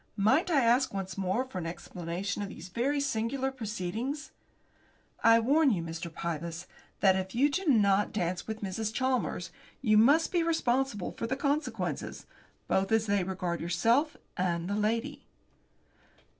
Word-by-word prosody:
"Might 265 - +3
I 285 -6 +3
ask, 245 +3 +3
once 190 -2 -4
more, 195 +6 0
for 230 -8 -6
an 165 - -4
explanation 175 +4 -4
of 200 - -4
these 185 -1 -9
very 265 +9 0
singular 265 0 -1
proceedings?" 230 +5 -4 0.9
"I 230 0 +7
warn 285 +6 +4
you, 185 -8 0
Mr. 165 +1 -6
Pybus, 170 +1 -4 0.4
that 190 -1 +5
if 190 +1 -3
you 280 +4 +3
do 375 +5 -2
not 205 -6 +4
dance 180 -3 -2
with 220 -1 -5
Mrs. 210 +3 -2
Chalmers, 230 -9 -1 0.3
you 215 -4 +4
must 285 +9 +5
be 350 - +2
responsible 270 - 0
for 230 - -4
the 260 - -1
consequences, 285 +2 -2 0.4
both 195 +2 +1
as 225 0 +3
they 200 -2 +1
regard 180 -2 -3
yourself 230 - +2 0.2
and 175 -1 -1
the 200 - -1
lady." 230 +7 -1
215 Hz, 155 wpm, -30 LUFS, 185-265 Hz, 0.9 s, I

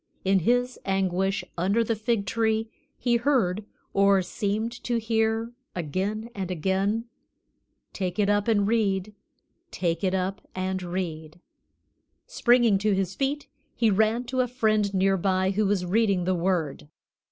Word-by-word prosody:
In 190 0 +4
his 245 +6 +1
anguish 195 0 0 0.2
under 200 +6 +2
the 230 0 -1
fig 215 -1 -1
tree 220 0 0 0.3
he 240 -1 +2
heard, 230 -7 +1 0.3
or 200 -1 +4
seemed 210 +4 -2
to 240 -1 0
hear, 225 0 0 0.2
again 195 +7 -3
and 190 -4 -4
again, 195 +6 0 0.9
"Take 185 -1 -3
it 205 -2 +2
up 205 +1 +2
and 205 -3 +3
read, 210 -3 0 0.6
Take 170 +1 -2
it 190 0 +1
up 190 +2 -2
and 185 0 -2
read." 170 -3 -5 0.9
Springing 240 -5 +3
to 210 0 +2
his 190 -1 -1
feet, 280 +5 -2 0.3
he 230 -3 +3
ran 220 +4 +2
to 255 +1 -3
a 250 - 0
friend 215 -4 +1
near 195 0 +2
by 190 0 +1
who 210 +1 +1
was 195 -2 0
reading 200 -1 +2
the 185 +1 +1
Word. 170 -5 -1
200 Hz, 145 wpm, -26 LUFS, 185-225 Hz, 0.9 s, In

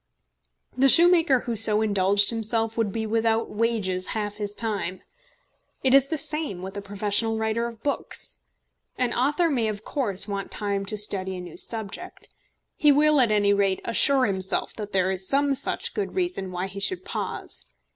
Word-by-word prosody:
The 270 +2 +4
shoemaker 335 -5 +6
who 235 - -3
so 215 0 +4
indulged 200 0 +3
himself 225 0 -1
would 225 -3 0
be 220 +2 -3
without 225 +1 0
wages 210 -5 -1
half 210 -1 -4
his 205 -1 -4
time. 205 -5 -3 0.8
It 260 -1 +3
is 275 0 +6
the 315 - -2
same 300 - -3
with 190 +1 -7
a 200 - -4
professional 205 +3 0
writer 220 +1 -1
of 230 -1 -11
books. 285 - -2 0.6
An 245 -2 0
author 295 +7 +1
may 250 -8 0
of 215 0 -5
course 205 -8 0
want 200 -1 -4
time 200 -2 -3
to 215 - -2
study 190 -2 -2
a - - -6
new 175 -2 -9
subject. 225 - -5 0.4
He 300 -2 +4
will 300 0 +4
at 235 -3 +2
any 205 -1 +3
rate 195 -2 +1
assure 265 +3 +4
himself 190 -2 -1
that 210 -2 -7
there 190 0 +1
is 190 0 -3
some 280 0 +2
such 270 - -3
good 415 - -4
reason 350 - -2
why 180 +1 -3
he 195 +1 -7
should 360 - 0
pause. - - -5
220 Hz, 175 wpm, -25 LUFS, 200-260 Hz, 0.8 s, shoemaker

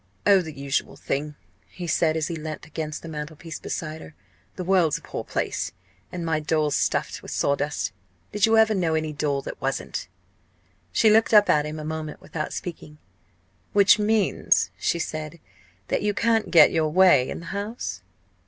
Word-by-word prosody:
"Oh, 195 -2 +6
the 160 -4 -8
usual 140 0 -2
thing!" 150 +2 -3 0.3
he 180 - -8
said, 160 -1 +1
as 160 -1 -1
he 170 - -4
leant 155 -1 -6
against 155 -1 -5
the - - -7
mantelpiece 155 +1 -7
beside 160 0 -5
her. 150 - -12 0.4
"The 185 - -4
world's 180 -4 +3
a - - -13
poor - - -5
place, 90 -1 -3 0.4
and 175 -2 -4
my 160 -1 +1
doll's 150 -1 0
stuffed - - -1
with - - -10
sawdust. 140 -2 -1 0.4
Did 210 +1 +3
you 225 0 +4
ever 220 0 +5
know 170 -5 +1
any 155 -1 -1
doll 145 -2 -1
that - - -8
wasn't?" - - -3 0.8
She 215 - +4
looked 220 +1 +4
up 205 -1 +7
at 150 0 +2
him 155 +1 -6
a 155 - -6
moment 155 -1 -5
without 155 -2 -5
speaking. 155 -3 -7 0.8
"Which 200 +1 +6
means," 210 0 +2
she - - 0
said, 155 0 -5 0.5
"that - - 0
you 205 -1 0
can't 225 -1 +1
get 170 - +7
your 155 -1 +1
way 180 -7 +5
in - - -5
the 170 - -10
House?" 200 - -4
160 Hz, 180 wpm, -25 LUFS, 150-190 Hz, 0.8 s, up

